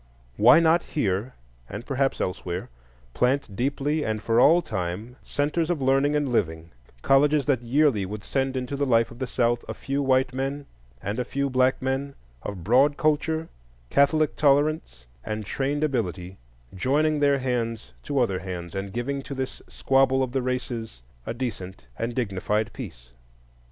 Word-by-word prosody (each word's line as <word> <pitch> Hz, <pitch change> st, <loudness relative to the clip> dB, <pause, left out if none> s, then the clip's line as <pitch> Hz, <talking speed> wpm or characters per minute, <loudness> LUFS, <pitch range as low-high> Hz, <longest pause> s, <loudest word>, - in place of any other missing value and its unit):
Why 120 Hz, +8 st, +7 dB
not 165 Hz, +1 st, +4 dB
here, 110 Hz, -, -2 dB, 0.3 s
and 105 Hz, +5 st, -7 dB
perhaps 135 Hz, -1 st, 0 dB
elsewhere, 90 Hz, -3 st, -3 dB, 0.4 s
plant 125 Hz, -4 st, 0 dB
deeply 145 Hz, +5 st, 0 dB
and 110 Hz, -1 st, -1 dB
for 115 Hz, +2 st, +1 dB
all 170 Hz, +7 st, +6 dB
time 95 Hz, +5 st, -4 dB
centres 150 Hz, +3 st, -1 dB
of 175 Hz, -4 st, 0 dB
learning 135 Hz, +2 st, +2 dB
and 145 Hz, -3 st, 0 dB
living, 80 Hz, -7 st, -1 dB, 0.3 s
colleges 145 Hz, +1 st, +4 dB
that 135 Hz, -5 st, +1 dB
yearly 125 Hz, -3 st, +2 dB
would 105 Hz, +2 st, -6 dB
send 135 Hz, -1 st, -1 dB
into 130 Hz, +2 st, -3 dB
the 140 Hz, 0 st, 0 dB
life 115 Hz, -2 st, +3 dB
of 120 Hz, -, -12 dB
the 130 Hz, -, -2 dB
South 120 Hz, -1 st, +1 dB
a -, -, -4 dB
few 140 Hz, +1 st, -2 dB
white 130 Hz, -1 st, +2 dB
men 135 Hz, +2 st, -3 dB, 0.4 s
and 105 Hz, +5 st, -3 dB
a -, -, +1 dB
few 140 Hz, +2 st, -2 dB
black 130 Hz, 0 st, +3 dB
men 135 Hz, +1 st, -2 dB, 0.3 s
of 95 Hz, -4 st, -6 dB
broad 135 Hz, -, +4 dB
culture, 160 Hz, +1 st, +1 dB, 0.4 s
catholic 150 Hz, +2 st, +3 dB
tolerance, 145 Hz, -, +1 dB, 0.2 s
and 110 Hz, -1 st, -4 dB
trained 140 Hz, +7 st, -1 dB
ability, 95 Hz, -, -2 dB, 0.3 s
joining 150 Hz, +8 st, +1 dB
their 140 Hz, -1 st, +4 dB
hands 115 Hz, -, -2 dB
to 140 Hz, -, -3 dB
other 100 Hz, -8 st, +2 dB
hands, 90 Hz, -2 st, -6 dB
and 95 Hz, 0 st, -4 dB
giving 135 Hz, +4 st, -2 dB
to 140 Hz, -, -7 dB
this 130 Hz, -1 st, -4 dB
squabble 135 Hz, 0 st, +2 dB
of 130 Hz, -, -3 dB
the 135 Hz, +1 st, 0 dB
Races 120 Hz, -, -4 dB, 0.2 s
a -, -, -2 dB
decent 95 Hz, -, -5 dB
and 115 Hz, -, -3 dB
dignified 105 Hz, -1 st, -1 dB
peace? 65 Hz, -, -9 dB
130 Hz, 160 wpm, -25 LUFS, 110-140 Hz, 0.4 s, Why